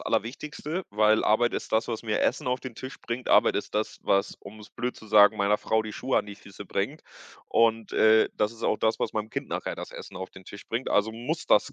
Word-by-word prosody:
Allerwichtigste, 150 - -3
weil 105 +1 +3
Arbeit 120 +3 +3
ist - - -5
das, 110 +1 +2
was 115 -1 -4
mir 110 -2 0
Essen - - 0
auf 125 0 0
den 125 -4 -8
Tisch 130 +1 -8
bringt. 120 +2 -5
Arbeit - - +5
ist - - -4
das, 105 +1 -2
was 100 0 +1
um 105 +2 -12
es 105 - -13
blöd 125 0 -3
zu 110 - -14
sagen 105 0 +6
meiner 100 +1 +2
Frau 110 0 +1
die 110 -1 -7
Schuhe 130 +4 0
an - - -3
die 100 -1 -9
Füße 100 0 -11
bringt. 105 +11 -3 0.5
Und, 115 -1 +2
äh, 110 0 +5
das 105 +1 +1
ist 115 - -14
auch - - +2
das, 110 - +1
was - - -1
meinem 110 0 -3
Kind - - -4
nachher - - -3
das - - -7
Essen - - -10
auf 95 0 -6
den 95 - -14
Tisch 100 - -11
bringt, 115 +3 -2
also 105 +2 +2
muss 115 +2 -4
das - - +3
110 Hz, 245 wpm, -27 LUFS, 105-120 Hz, 0.5 s, sagen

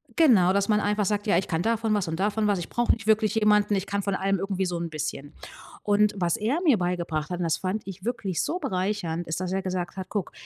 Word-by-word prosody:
genau, 215 - +5
dass 200 +2 +1
man 210 -1 +4
einfach 210 0 0
sagt, 205 +1 -1
ja: 170 - +4
„Ich 190 - -1
kann 165 0 0
davon 225 0 +1
was 200 -4 0
und 160 0 -3
davon 210 +1 +1
was. 200 -3 +1
Ich 170 - -6
brauche 240 0 +2
nicht 225 -2 -7
wirklich 215 0 +3
jemanden. 210 -1 +3
Ich 195 +1 -2
kann 200 0 -2
von 200 -1 -1
allem 195 0 0
irgendwie 195 -1 -1
so 175 -1 -2
'n 170 0 -4
bisschen.“ 150 -1 -5 0.5
Und 210 0 +3
was 175 -2 +1
er 235 +9 0
mir 290 -10 +5
beigebracht 170 -4 -2
hat 180 -1 -4
und 175 - -1
das 165 - +1
fand 195 +3 -2
ich 195 +1 -9
wirklich 230 -8 -2
so 355 - -2
bereichernd, 185 - -2
ist, 160 0 -2
dass 185 -1 -3
er 195 - 0
gesagt 185 0 -4
hat: 190 - -5
„Guck, 205 -4 -3
195 Hz, 260 wpm, -26 LUFS, 175-210 Hz, 0.5 s, genau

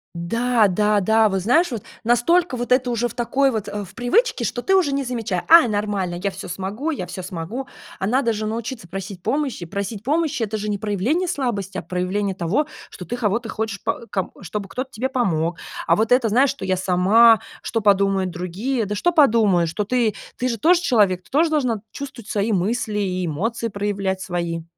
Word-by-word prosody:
Да, 230 +6 +2
да, 210 +2 +2
да, 220 +3 +4
вот 195 -1 -1
знаешь, 260 - +3
вот 225 -4 -4 0.2
настолько 255 +7 +2
вот 245 +1 -4
это 250 -1 +3
уже 240 0 0
в 235 - -11
такой 270 +3 +2
вот, 220 -4 -3
э, 205 0 -4
в 190 - -13
привычке, 250 - +1
что 245 - -2
ты 385 +9 +2
уже 365 -7 +3
не 275 0 0
замеча 225 -8 -2
А, 330 -4 +8
нормально, 205 -4 -2
я 200 - 0
всё 190 +1 -8
смогу, 200 - -3
я 185 - -4
всё 180 +1 -7
смогу. 185 +9 -5 0.3
А 190 - -2
надо 240 +2 +2
же 215 0 -3
научиться 225 -2 -4
просить 190 0 -7
помощи. 275 - -1
Просить 200 +3 -5
помощи 300 -3 0
это 215 0 -2
же 210 0 -4
не 205 - -1
проявление 220 - 0
слабости, 235 - -2
а - - -6
проявление 185 +3 -2
того, 190 - 0 0.2
что 180 - -9
ты 240 - -4
кого-то 225 0 -1
хочешь 220 -2 -3
по 235 - -2
ком 190 -3 -2
чтобы 195 +2 -5
кто-то 260 +1 -5
тебе 255 +5 -2
помог. 175 - 0 0.3
А - - +5
вот 220 +2 0
это, 250 -2 +4
знаешь, 255 +5 +4
что 280 - -9
"я 185 -1 0
сама, 200 +5 +5 0.2
что 225 - -1
подумают 195 -2 +3
другие"? 195 +8 -2
Да 205 - -3
что 350 +12 +1
подумают, 220 - +4
что 190 +6 -2
ты, 230 0 +1 0.2
ты 255 - -1
же 230 -4 -2
тоже 345 +5 +4
человек, 200 - +2
ты - - -24
тоже 315 +4 +3
должна 250 -9 0
чувствовать 260 -6 -8
свои 210 +2 0
мысли 210 +2 0
и 185 -2 -1
эмоции 225 +9 -2
проявлять 200 -2 -2
свои. 170 -3 -3
215 Hz, 205 wpm, -22 LUFS, 190-250 Hz, 0.3 s, А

